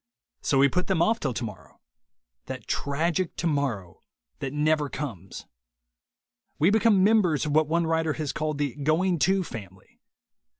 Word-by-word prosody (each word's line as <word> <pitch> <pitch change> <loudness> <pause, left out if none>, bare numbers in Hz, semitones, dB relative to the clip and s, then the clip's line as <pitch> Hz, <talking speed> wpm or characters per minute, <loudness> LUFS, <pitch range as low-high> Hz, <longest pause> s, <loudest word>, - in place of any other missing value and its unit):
So 135 - +1
we 140 +1 +6
put 180 +7 -1
them 180 -4 +2
off 225 +5 +2
till 135 - -1
tomorrow 105 -8 -7 0.3
— - - -57
that - - -6
tragic 165 +5 -1
tomorrow 140 - -2 0.4
that 135 - -4
never 150 0 +1
comes. 105 - -7 1.1
We 165 +6 +4
become 215 -3 +4
members 190 -9 +3
of 150 - -2
what 155 0 +3
one 170 +2 +1
writer 160 -1 0
has 150 -2 -3
called 155 -1 -2
the 145 -4 -2
"Going 165 +5 +1
To" 190 +4 +2
family. 95 - -11
150 Hz, 155 wpm, -26 LUFS, 135-170 Hz, 1.1 s, we